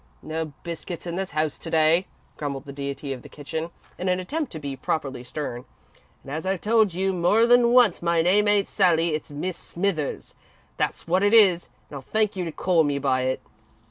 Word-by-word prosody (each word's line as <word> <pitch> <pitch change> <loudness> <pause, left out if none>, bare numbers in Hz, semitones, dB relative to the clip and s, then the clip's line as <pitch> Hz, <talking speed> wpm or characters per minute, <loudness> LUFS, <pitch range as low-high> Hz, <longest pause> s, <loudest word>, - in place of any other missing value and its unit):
"No 160 +1 -3 0.2
biscuits 170 0 -6
in 170 -1 -4
this 190 +1 -3
house 155 -2 -1
to - - -6
day," 160 +3 +3 0.3
grumbled 140 -2 -4
the 140 - -8
deity 140 0 -4
of 125 - -9
the - - -13
kitchen, 160 +3 -5 0.3
in 185 - -1
an 180 0 +1
attempt 295 - -3
to 160 - -6
be 140 -2 -5
properly 135 -3 -3
stern, 125 -2 -5 0.6
"and 135 - -9
as 155 +2 -3
I've 190 -1 -1
told 215 -4 +3
you 190 +1 0
more 185 +6 +3
than 240 0 +5
once, 245 -7 +5
my 170 -1 +2
name 205 +4 +3
ain't 205 -1 +3
'Sally.' 170 -4 +2
It's 155 - -4
Mis' 160 +5 -4
Smithers, 170 -5 -3 0.4
that's - - -2
wot 180 +3 +2
it 205 +3 +4
is, 190 -6 +5 0.2
and 145 - -8
I'll - - -8
thank 215 +8 0
you 185 - -2
to 165 - -4
call 170 +1 +2
me 145 -1 0
by 130 -2 +1
it." 130 0 -1
170 Hz, 205 wpm, -24 LUFS, 145-195 Hz, 0.6 s, than